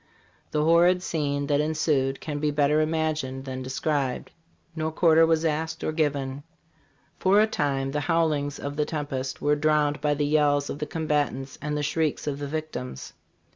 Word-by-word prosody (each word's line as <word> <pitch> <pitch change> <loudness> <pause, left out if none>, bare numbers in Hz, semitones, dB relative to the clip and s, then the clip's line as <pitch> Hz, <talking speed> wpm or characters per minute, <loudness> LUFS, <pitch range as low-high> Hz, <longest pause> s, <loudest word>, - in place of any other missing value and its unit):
The 150 -1 0
horrid 175 +3 +4
scene 145 -4 -1
that 145 0 +2
ensued 150 -3 0
can 145 -2 -4
be 150 0 +1
better 150 +1 +2
imagined 155 -4 -1
than 130 -1 -5
described. 130 0 -2 0.4
No 160 -1 -1
quarter 160 0 +4
was 160 0 +2
asked 160 +1 -2
or - - 0
given. 145 -3 -1 0.8
For 195 +2 +4
a 215 - +6
time 140 -9 -1
the 150 +1 -2
bowlings 155 -4 +1
of 145 +1 -5
the 150 - +1
tempest 135 -4 -4
were 150 0 +3
drowned 150 -1 +1
by 145 0 +1
the 145 0 0
yells 145 -1 +2
of 145 - -6
the 150 - -3
combatants 145 -4 -2
and 150 +1 -2
the 145 - -2
shrieks 155 0 -1
of 145 -1 -3
the 145 - -4
victims. 150 - -5
150 Hz, 175 wpm, -26 LUFS, 140-155 Hz, 0.8 s, a